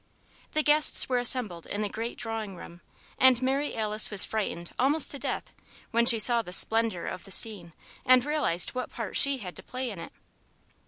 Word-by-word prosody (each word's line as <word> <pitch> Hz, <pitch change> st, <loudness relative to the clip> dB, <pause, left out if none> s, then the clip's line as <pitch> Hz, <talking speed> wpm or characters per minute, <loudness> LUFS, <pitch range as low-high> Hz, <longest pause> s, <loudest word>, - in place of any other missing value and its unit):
The 310 Hz, -, 0 dB
guests 300 Hz, 0 st, +6 dB
were 250 Hz, -1 st, -1 dB
assembled 240 Hz, -9 st, -1 dB
in 205 Hz, +1 st, -4 dB
the -, -, -2 dB
great 225 Hz, +4 st, -7 dB
drawing 220 Hz, -4 st, -6 dB
room, 175 Hz, 0 st, -13 dB, 0.4 s
and 260 Hz, -2 st, +4 dB
Mary 270 Hz, +3 st, -2 dB
Alice 215 Hz, -1 st, -1 dB
was 205 Hz, -3 st, +7 dB
frightened 185 Hz, -6 st, -5 dB
almost 285 Hz, +4 st, +3 dB
to 280 Hz, -, -5 dB
death -, -, -6 dB, 0.4 s
when 235 Hz, +1 st, 0 dB
she 235 Hz, -, +7 dB
saw 235 Hz, +2 st, +1 dB
the 180 Hz, -5 st, -9 dB
splendour 225 Hz, -3 st, -1 dB
of 180 Hz, -, -7 dB
the -, -, -14 dB
scene 190 Hz, -5 st, -4 dB, 0.3 s
and 255 Hz, 0 st, +3 dB
realized 295 Hz, -, -1 dB
what 255 Hz, -1 st, -6 dB
part 230 Hz, -3 st, -8 dB
she 280 Hz, -1 st, +6 dB
had 185 Hz, -7 st, -10 dB
to -, -, -6 dB
play 255 Hz, -1 st, -6 dB
in 195 Hz, -, -10 dB
it. -, -, -10 dB
230 Hz, 195 wpm, -26 LUFS, 205-255 Hz, 0.4 s, was